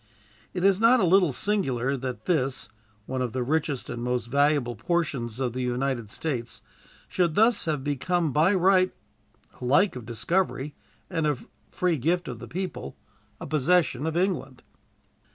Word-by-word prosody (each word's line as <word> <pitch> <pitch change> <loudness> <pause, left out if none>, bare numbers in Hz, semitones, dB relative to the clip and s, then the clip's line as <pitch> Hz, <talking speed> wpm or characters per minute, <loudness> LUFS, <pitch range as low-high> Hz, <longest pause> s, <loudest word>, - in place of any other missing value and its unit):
It 180 - -2
is 195 +1 +4
not 240 +3 +6
a 190 - +3
little 180 -2 +4
singular 135 - 0
that 125 -4 -5
this, 135 -8 0 0.4
one 130 +2 -3
of 125 -3 -2
the 130 -1 -1
richest 145 0 -1
and 120 - -5
most 125 -1 -1
valuable 140 -1 +2
portions 125 - -2
of 125 -3 -1
the 130 - -3
United 125 -2 -1
States, 125 -2 -4 0.4
should 170 -4 0
thus 225 +1 +4
have 150 -4 -1
become 150 +2 0
by 165 +7 +4
right, 185 0 +3 0.7
alike, 145 +10 +3
of 120 -3 -8
discovery 145 - -1 0.3
and 160 -2 -1
of 145 -5 -2 0.2
free 175 -4 0
gift 175 +7 0
of 120 -3 -6
the - - -9
people, 185 +1 -5 0.4
a - - -6
possession 155 -1 +2
of 160 +1 -1
England. 170 -9 -1
145 Hz, 155 wpm, -26 LUFS, 125-180 Hz, 0.7 s, not